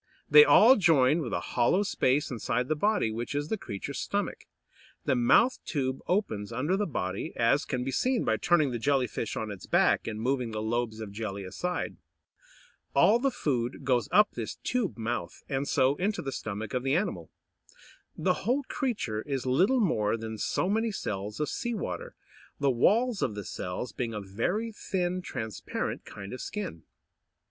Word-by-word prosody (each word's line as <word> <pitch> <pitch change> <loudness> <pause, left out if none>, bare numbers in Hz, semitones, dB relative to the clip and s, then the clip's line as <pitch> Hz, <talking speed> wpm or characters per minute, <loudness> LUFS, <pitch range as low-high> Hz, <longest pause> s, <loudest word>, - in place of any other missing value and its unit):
They 450 - +9
all 260 - +7
join 155 -5 +4
with 125 - -4
a - - 0
hollow 125 +11 +3
space 145 -8 +1
inside 125 +1 -1
the 155 - +2
body, 205 - +1
which 120 +5 -4
is 145 +2 -2
the - - +1
creature's 100 - -5
stomach. - - -3 0.6
The - - +2
mouth 125 - +4
tube 130 -4 -2
opens 115 - -1
under 145 +10 0
the 205 +1 0
body, 95 - -3
as 120 +6 +2
can 125 -2 -2
be 135 - -2
seen 255 - +1
by 110 - +2
turning 155 +2 +3
the 120 - -3
Jelly 135 +1 +2
fish 115 - -4
on 110 -1 -3
its 100 -3 -9
back, - - +3
and 110 -1 -4
moving 125 0 0
the 110 -1 -4
lobes 110 0 -2
of 105 -2 -6
jelly 100 -2 -4
aside. 175 - -3 1.0
All 230 +3 +5
the 275 +2 +2
food 130 - -2
goes 125 -5 +1
up 210 0 +5
this 115 -3 -5
tube 245 - -1
mouth, 115 -5 -4
and 135 0 -2
so 130 +2 +3
into 200 +3 -1
the 135 - -3
stomach 110 -3 -5
of 125 - 0
the 135 +2 +1
animal. 195 +5 -2 0.9
The - - +2
whole 265 +4 +1
creature 230 - -2
is 135 -2 -3
little 185 - +3
more 110 - +1
than 110 -1 -6
so 175 - 0
many 220 +3 +1
cells 105 - -4
of 150 - 0
sea 240 - -3
water, 90 - -5 0.4
the 140 -1 +3
walls 215 - +2
of 105 - 0
the 105 -2 -6
cells 90 +7 -4
being 115 -3 -3
a - - -2
very 115 - -2
thin, 185 -3 -2
transparent 110 - -4
kind 100 +1 -8
of 125 - -6
skin. 200 - -5
130 Hz, 180 wpm, -29 LUFS, 110-185 Hz, 1.0 s, They